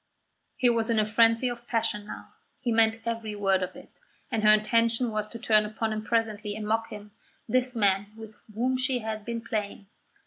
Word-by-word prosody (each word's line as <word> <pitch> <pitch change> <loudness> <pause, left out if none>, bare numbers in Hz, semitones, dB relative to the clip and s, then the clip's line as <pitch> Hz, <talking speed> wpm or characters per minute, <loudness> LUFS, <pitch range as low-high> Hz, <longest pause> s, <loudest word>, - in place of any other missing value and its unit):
He 255 - +3
was 230 -1 +1
in 230 - +2
a 215 - +3
frenzy 230 +3 +4
of 240 0 -6
passion 210 -3 -1
now; - - -9 0.3
he 250 -3 -2
meant 225 0 +3
every 230 -2 -3
word 195 -2 +1
of 185 - -4
it; - - -15 0.3
and 225 -3 0
her 215 - +7
intention 230 +2 +2
was 215 -1 -2
to 230 - -8
turn 220 -2 +3
upon 220 +1 -3
him 215 0 -4
presently 215 -2 -1
and 215 -1 -5
mock 225 +1 0
him, 210 0 -10 0.4
this 250 +1 +1
man 200 -2 +2
with 220 -1 -10 0.2
whom 255 +3 0
she 255 0 +1
had 220 -2 -5
been 235 -1 -4
playing. 210 -3 -4
225 Hz, 200 wpm, -27 LUFS, 215-230 Hz, 0.4 s, her